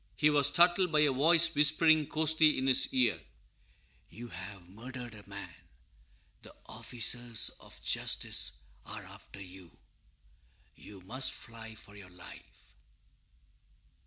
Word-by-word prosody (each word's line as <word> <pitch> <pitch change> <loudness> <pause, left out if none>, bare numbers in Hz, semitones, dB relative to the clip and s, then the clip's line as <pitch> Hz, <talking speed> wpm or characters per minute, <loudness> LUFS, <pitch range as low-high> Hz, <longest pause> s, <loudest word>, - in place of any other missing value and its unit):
He 150 0 +2
was 145 -2 +4
startled 175 +4 +3
by 155 -1 +3
a 150 -2 +3
voice 160 +5 +4
whispering 155 +1 +3
hoarsely 155 0 +3
in 130 - -2
his 135 0 +2
ear, 125 -2 +1
_"You 115 - -18
have 95 -3 -10
murdered 120 +4 -10
a 105 -2 -15
man; 100 0 -9 0.9
the - - -16
officers 120 -1 0
of - - -15
justice - - -1 0.3
are - - -9
after 100 - -15
you; 90 -2 -13 1.0
you 100 -2 -14
must 130 +8 -3
fly 115 -1 -11
for 100 -1 -14
your 100 -2 -13
life!" 90 0 -16
125 Hz, 125 wpm, -30 LUFS, 100-150 Hz, 1.0 s, was